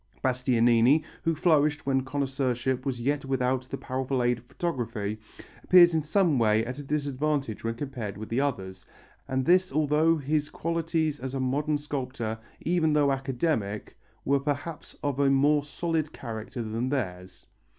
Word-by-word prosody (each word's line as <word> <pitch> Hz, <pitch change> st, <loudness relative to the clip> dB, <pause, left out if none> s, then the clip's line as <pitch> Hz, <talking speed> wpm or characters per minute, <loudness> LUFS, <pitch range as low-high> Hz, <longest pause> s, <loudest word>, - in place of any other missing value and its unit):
Bastianini, 125 Hz, +1 st, +3 dB, 0.2 s
who 165 Hz, 0 st, 0 dB
flourished 150 Hz, -2 st, +2 dB
when 135 Hz, -1 st, +2 dB
connoisseurship 130 Hz, -1 st, -1 dB
was 125 Hz, -3 st, -2 dB
yet 140 Hz, +4 st, 0 dB
without 130 Hz, -1 st, 0 dB
the 135 Hz, -, -4 dB
powerful 130 Hz, -1 st, -2 dB
aid 120 Hz, -1 st, +1 dB
of 120 Hz, -, -21 dB
photography, 115 Hz, -9 st, -3 dB, 0.4 s
appears 175 Hz, -2 st, +7 dB
in 160 Hz, -, +2 dB
some 155 Hz, -2 st, +2 dB
way 110 Hz, 0 st, +3 dB
at 125 Hz, +4 st, -5 dB
a -, -, -6 dB
disadvantage 140 Hz, -3 st, -1 dB
when 115 Hz, 0 st, -2 dB
compared 120 Hz, -6 st, -5 dB
with 110 Hz, +1 st, -7 dB
the 120 Hz, +4 st, +1 dB
others, 95 Hz, -10 st, -3 dB, 0.4 s
and 130 Hz, 0 st, -1 dB
this 185 Hz, +3 st, +4 dB
although 155 Hz, +3 st, +3 dB
his 150 Hz, +1 st, -1 dB
qualities 165 Hz, -2 st, -1 dB
as 130 Hz, +1 st, -5 dB
a -, -, -1 dB
modern 145 Hz, +4 st, 0 dB
sculptor, 130 Hz, -6 st, -4 dB, 0.2 s
even 160 Hz, -2 st, +1 dB
though 145 Hz, -2 st, +3 dB
academic, 135 Hz, -6 st, -2 dB, 0.3 s
were 140 Hz, +1 st, +3 dB
perhaps 145 Hz, +3 st, -4 dB
of 140 Hz, -2 st, -1 dB
a 140 Hz, -1 st, +4 dB
more 145 Hz, +2 st, +3 dB
solid 155 Hz, +1 st, -2 dB
character 115 Hz, 0 st, -6 dB
than 115 Hz, +3 st, -2 dB
theirs. 90 Hz, -9 st, -4 dB
135 Hz, 155 wpm, -27 LUFS, 120-150 Hz, 0.4 s, appears